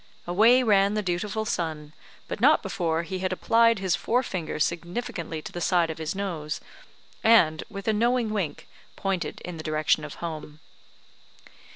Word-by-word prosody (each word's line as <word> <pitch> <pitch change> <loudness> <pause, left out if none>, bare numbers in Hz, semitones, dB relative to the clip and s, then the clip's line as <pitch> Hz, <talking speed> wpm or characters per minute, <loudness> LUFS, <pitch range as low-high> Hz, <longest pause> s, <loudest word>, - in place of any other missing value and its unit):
Away 225 +8 +5
ran 200 -2 +3
the 210 - 0
dutiful 200 +4 -2
son, 155 -6 -3 0.3
but - - -5
not - - +5
before 165 -1 -1
he 185 +2 -5
had 185 0 -1
applied 230 +4 +3
his 190 -3 +1
forefinger 225 -9 -1
significantly 170 +1 -3
to - - -7
the 175 - -6
side 170 -2 +2
of 160 - -8
his 160 +3 -3
nose, 165 -6 -3 0.6
and, 165 -9 +5
with 200 0 -8
a 220 - +3
knowing 235 +1 +1
wink, 195 -8 -3 0.3
pointed 195 -2 -3
in 180 -2 -7
the 155 - -7
direction 155 -1 +1
of 150 - -7
home. 155 -2 -7
185 Hz, 160 wpm, -26 LUFS, 160-215 Hz, 0.6 s, Away